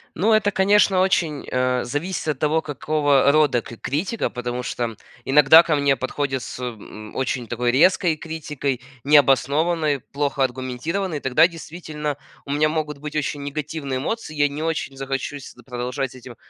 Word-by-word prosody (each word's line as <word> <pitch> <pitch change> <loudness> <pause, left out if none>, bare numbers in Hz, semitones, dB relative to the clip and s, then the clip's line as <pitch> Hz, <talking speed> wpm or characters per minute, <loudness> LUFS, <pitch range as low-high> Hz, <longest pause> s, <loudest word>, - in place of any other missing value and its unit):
Ну 205 +7 +2
это, 215 -2 +3
конечно, 195 -1 +4
очень, 165 -6 0
э, 125 0 +1
зависит 160 +8 -3
от 150 -3 -1
того, 155 +1 +1
какого 145 -1 +2
рода 145 -6 +3
кр 115 - -10
критика, 170 - -2
потому 125 0 -4
что 120 -2 -3 0.3
иногда 150 +4 +7
ко 165 -3 +1
мне 140 -1 +2
подходят 130 +1 -2
с, - - -8
м, 110 -3 -8
очень 125 -2 -2
такой 120 +1 0
резкой 170 +4 +4
критикой, 150 -5 -4 0.2
необоснованной, 145 +2 +3
плохо 140 -1 -1
аргументированной. 130 +7 -2
Тогда 135 +6 +4
действительно 155 -3 -6 0.3
у 140 - -6
меня 150 +2 +2
могут 150 -2 -3
быть 150 +1 -7
очень 145 -1 -2
негативные 140 -1 -4
эмоции, 155 - -4
я 145 0 +3
не 145 +2 -6
очень 160 -4 -2
захочу 135 +1 -3
с 135 - -11
т 120 - -17
продолжать 125 +1 -4
с - - -14
этим 125 -1 -11
145 Hz, 165 wpm, -22 LUFS, 130-155 Hz, 0.3 s, иногда